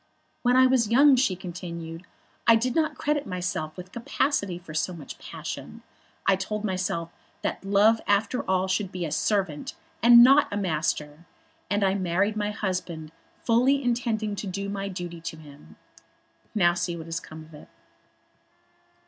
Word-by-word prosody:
"When 245 0 +3
I 260 0 +7
was 255 -4 +3
young," 275 +4 +6
she 250 -7 +2
continued, 170 -1 -7 0.4
"I 230 - +8
did 240 +2 0
not 315 +1 0
credit 295 -1 -1
myself 180 -4 -3
with 180 0 -9
capacity 230 - -1
for 175 -3 -11
so 170 +4 -1
much 160 -5 -10
passion. - - -8 0.4
I 195 - +5
told 205 +3 -4
myself 185 -3 -2 0.3
that - - -3
love 205 +3 +4
after 205 +5 +1
all 190 0 +2
should 190 0 -1
be 180 -2 -3
a 155 - -5
servant 195 -7 -1 0.3
and 235 +1 +9
not 275 +3 +6
a 205 - -2
master, 155 -3 -2 0.4
and 205 +1 +1
I 190 -1 +3
married 195 +2 0
my 210 -1 -1
husband 185 -6 -4 0.3
fully 255 +4 +3
intending 230 -4 -1
to 200 - -4
do 200 +1 -4
my 200 0 -3
duty 175 -3 -6
to 160 -1 -6
him. 150 -2 -15 0.8
Now 175 -5 +4
we 175 - -5
see 175 -1 -2
what 160 - -8
has 165 0 -3
come 155 0 -11
of 160 - -18
it." 150 - -13
195 Hz, 165 wpm, -26 LUFS, 170-225 Hz, 0.8 s, and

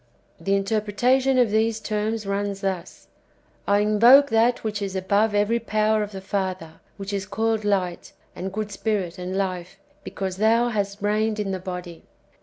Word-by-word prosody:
^ - - -14
The 195 0 +2
in 195 - +1
terpretation 245 +6 +1
of 240 -4 +3
these 220 +1 +1
terms 215 0 -2
runs 200 0 -2
thus: 190 -3 -4 0.3
" - - -36
I 205 0 +3
invoke 235 +6 +6
that 230 +2 +2
which 215 -1 -3
is 195 -1 -4
above 200 +3 +1
every 210 +3 +2
power 215 -1 +1
of 210 0 -4
the 190 -1 -7
Father, 185 -4 -4 0.2
which 200 0 -6
is 195 -1 -3
called 220 +2 -1
light, 190 -4 -1 0.2
and 190 +1 -5
good 210 +1 -4
Spirit, 200 -5 -2
and 180 +1 -4
life, 185 -1 -3 0.3
because 190 -2 -5
Thou 230 +3 +3
hast 205 -2 -3
reigned 215 +1 0
in 200 -2 -2
the 190 - -3
body." 180 -2 -7
205 Hz, 180 wpm, -24 LUFS, 195-220 Hz, 0.3 s, invoke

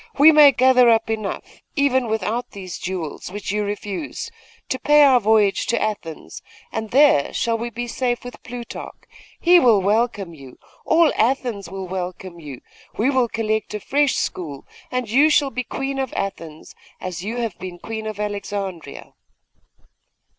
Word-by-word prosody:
We 295 +3 +8
may 300 -2 +8
gather 255 -2 +5
up 225 -1 +2
enough, 215 -3 -5
even 260 -4 +2
without 220 +2 -2
these 185 -4 -7
jewels, 180 -5 -5
which 205 0 -5
you 210 0 0
refuse, 205 +5 -5 0.4
to 260 - -2
pay 295 +2 +5
our 265 -3 +6
voyage 215 -2 +2
to 235 - +1
Athens, 205 -7 -5 0.3
and 220 -1 -4
there 270 - +5
we - - -13
shall 230 -1 0
be 240 +1 -5
safe 240 0 -2
with 245 0 -10
Plutarch; 245 -1 -8 0.4
he 350 +1 +6
will 235 -9 +5
welcome 205 -2 0
you 135 -5 -13 0.3
all 325 -1 +4
Athens 230 -5 0
will 190 0 -6
welcome 180 -1 -6
you 145 -6 -9 0.4
we 250 +6 +2
will 260 -3 +2
collect 220 -2 -2
a - - -3
fresh 285 +5 +1
school 145 -6 -4 0.2
and 250 -2 -2
you 275 +8 +4
shall 290 -2 +3
be 250 - -3
Queen 270 +2 -4
of 265 -2 -3
Athens, 165 -5 -6 0.3
as 180 -1 -6
you 225 +4 -4
have 230 -6 -2
been 185 -1 -7
Queen 220 +3 -6
of 215 -1 -6
Alexandria! 200 -6 -5
220 Hz, 160 wpm, -21 LUFS, 195-255 Hz, 0.4 s, We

